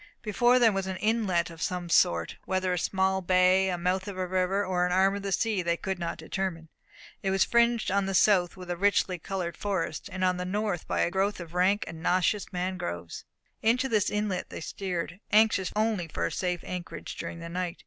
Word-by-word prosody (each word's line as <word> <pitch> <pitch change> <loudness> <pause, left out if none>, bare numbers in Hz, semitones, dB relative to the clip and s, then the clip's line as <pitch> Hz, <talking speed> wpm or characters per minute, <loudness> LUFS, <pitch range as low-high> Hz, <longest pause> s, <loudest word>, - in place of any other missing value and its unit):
Before 240 +3 +3
them 230 -4 +5
was 195 -1 -2
an 190 -1 -3
inlet 190 -5 +1
of 165 - -11
some 180 -1 -2
sort 85 - +2
whether 185 -1 0
a 180 - 0
small 190 +1 +1
bay, 185 +1 +4
the 180 - -1
mouth 185 +2 -1
of 200 -2 -6
a 185 - -1
river, 185 +2 0
or 180 -1 0
an 180 - +1
arm 190 +2 +3
of 200 - -4
the 195 0 -4
sea, 215 -1 +1
they 170 -1 0
could 190 0 -3
not 170 -1 -3
determine; 175 -5 -4 0.5
it 195 - -1
was 190 0 +3
fringed 235 -3 +2
on 200 0 +1
the 195 - -1
south 185 -2 +3
with 180 -1 -7
a - - -1
richly 190 -1 +1
coloured 175 -1 -4
forest, 190 -6 -3
and 185 0 -3
on 185 -1 +2
the 180 - -3
north 200 -1 -2
by - - 0
a - - +1
growth 195 +2 0
of 170 -1 -9
rank 190 +4 +2
and 160 - -8
nauseous 185 +4 +1
mangroves. 180 - -4 0.4
Into 245 +4 +2
this 215 -5 +2
inlet 210 -3 -2
they - - -7
steered, 180 +1 -4
anxious 210 -3 +4
only 215 -5 0
for - - -2
a - - -2
safe 180 -2 -2
anchorage 180 -1 -6
during 170 0 -6
the 170 - -7
night. 180 +1 -4
185 Hz, 215 wpm, -28 LUFS, 180-200 Hz, 0.5 s, them